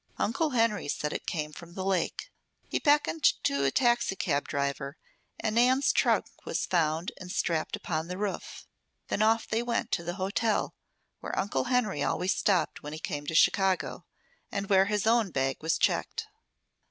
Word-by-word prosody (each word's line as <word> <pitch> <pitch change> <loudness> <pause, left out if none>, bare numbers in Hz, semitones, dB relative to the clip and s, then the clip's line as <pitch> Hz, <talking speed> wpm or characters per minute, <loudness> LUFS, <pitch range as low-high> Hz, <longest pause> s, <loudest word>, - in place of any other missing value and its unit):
Uncle 300 +8 0
Henry 230 - +1
said 150 +1 -2
it - - -5
came 150 -2 -2
from 170 +2 -11
the 190 - -4
lake. 190 -3 -1 0.4
He - - -1
beckoned 295 +2 +2 0.2
to 140 0 +1
a - - +4
taxicab 195 - +1
driver, 140 0 -2 0.4
and 220 - -1
Nan's 255 +4 +4
trunk - - +3 0.2
was - - -2
found 165 -1 0
and 180 -1 -8
strapped 165 -3 0
upon 160 -1 -3
the 180 +1 -5
roof. 205 -1 -4 0.4
Then - - 0
off 225 +1 +3
they 225 +1 0
went 240 -1 -1
to 170 - 0
the 175 +1 -4
hotel 200 +3 0 0.5
where - - -5
Uncle 205 - 0
Henry 250 -5 +1
always 185 +2 +1
stopped 185 -6 +1
when 150 +1 -7
he 155 - -6
came 145 -2 -4
to 160 - -2
Chicago, 190 +3 +2 0.5
and 200 0 -3
where 190 0 +6
his 210 0 0
own 225 -2 +3
bag 135 -4 -1
was 160 +1 +1
checked. 460 - 0
190 Hz, 170 wpm, -29 LUFS, 160-225 Hz, 0.5 s, where